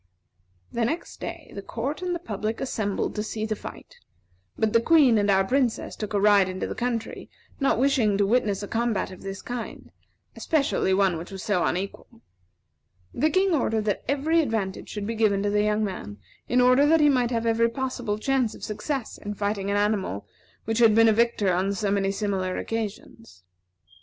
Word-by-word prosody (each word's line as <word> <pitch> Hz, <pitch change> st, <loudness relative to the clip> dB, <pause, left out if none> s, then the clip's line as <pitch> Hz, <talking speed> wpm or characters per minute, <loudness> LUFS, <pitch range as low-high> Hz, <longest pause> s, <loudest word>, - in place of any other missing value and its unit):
The 235 Hz, -, -1 dB
next 320 Hz, +9 st, -3 dB
day, 335 Hz, -2 st, -7 dB
the 200 Hz, -, -6 dB
court 260 Hz, -, -4 dB
and 360 Hz, -1 st, -1 dB
the -, -, -1 dB
public 220 Hz, -, -4 dB
assembled 215 Hz, -6 st, -2 dB
to 210 Hz, -, -2 dB
see 215 Hz, 0 st, -3 dB
the 215 Hz, 0 st, -2 dB
fight; -, -, -11 dB, 0.6 s
but 220 Hz, -1 st, +1 dB
the 230 Hz, -, +5 dB
Queen 270 Hz, -6 st, +5 dB
and 205 Hz, 0 st, +1 dB
our 195 Hz, -1 st, +4 dB
Princess 250 Hz, +2 st, 0 dB
took 210 Hz, -1 st, -5 dB
a -, -, +3 dB
ride 200 Hz, -2 st, +5 dB
into 185 Hz, 0 st, -3 dB
the -, -, -4 dB
country, 235 Hz, -1 st, -3 dB, 0.3 s
not 275 Hz, -5 st, +2 dB
wishing 245 Hz, -6 st, +2 dB
to 200 Hz, -, +3 dB
witness 210 Hz, -2 st, +1 dB
a -, -, -5 dB
combat 225 Hz, -4 st, -1 dB
of 185 Hz, -, -11 dB
this 195 Hz, 0 st, -7 dB
kind, 245 Hz, -1 st, -6 dB, 0.4 s
especially 280 Hz, -10 st, 0 dB
one 190 Hz, -3 st, +2 dB
which 170 Hz, -, -8 dB
was 190 Hz, -2 st, -7 dB
so 205 Hz, -5 st, +1 dB
unequal. 200 Hz, +5 st, -4 dB, 0.9 s
The 310 Hz, -, +2 dB
King 375 Hz, +1 st, +2 dB
ordered 225 Hz, -7 st, 0 dB
that 205 Hz, -, -1 dB
every 300 Hz, +5 st, +2 dB
advantage 220 Hz, -9 st, -3 dB
should 210 Hz, -1 st, -5 dB
be 230 Hz, -, -2 dB
given 210 Hz, -3 st, +2 dB
to 205 Hz, -, 0 dB
the 210 Hz, 0 st, +2 dB
young 210 Hz, +1 st, +1 dB
man, 180 Hz, -, -5 dB, 0.3 s
in 250 Hz, +2 st, +3 dB
order 255 Hz, +3 st, +5 dB
that 325 Hz, +2 st, +5 dB
he 300 Hz, -, +5 dB
might 250 Hz, -4 st, +3 dB
have 230 Hz, -2 st, -1 dB
every 230 Hz, 0 st, +3 dB
possible 245 Hz, -4 st, -3 dB
chance 255 Hz, 0 st, 0 dB
of -, -, -13 dB
success 230 Hz, +4 st, -4 dB
in 205 Hz, 0 st, -6 dB
fighting 200 Hz, -1 st, -2 dB
an 200 Hz, -, +1 dB
animal 205 Hz, -, -1 dB, 0.4 s
which 225 Hz, +1 st, -1 dB
had 225 Hz, -3 st, +6 dB
been 225 Hz, 0 st, +6 dB
a -, -, +4 dB
victor 220 Hz, -4 st, +2 dB
on 190 Hz, +3 st, 0 dB
so 200 Hz, +1 st, -1 dB
many 195 Hz, -1 st, +1 dB
similar 195 Hz, -2 st, -2 dB
occasions. 225 Hz, -, -6 dB
220 Hz, 195 wpm, -25 LUFS, 200-250 Hz, 0.9 s, had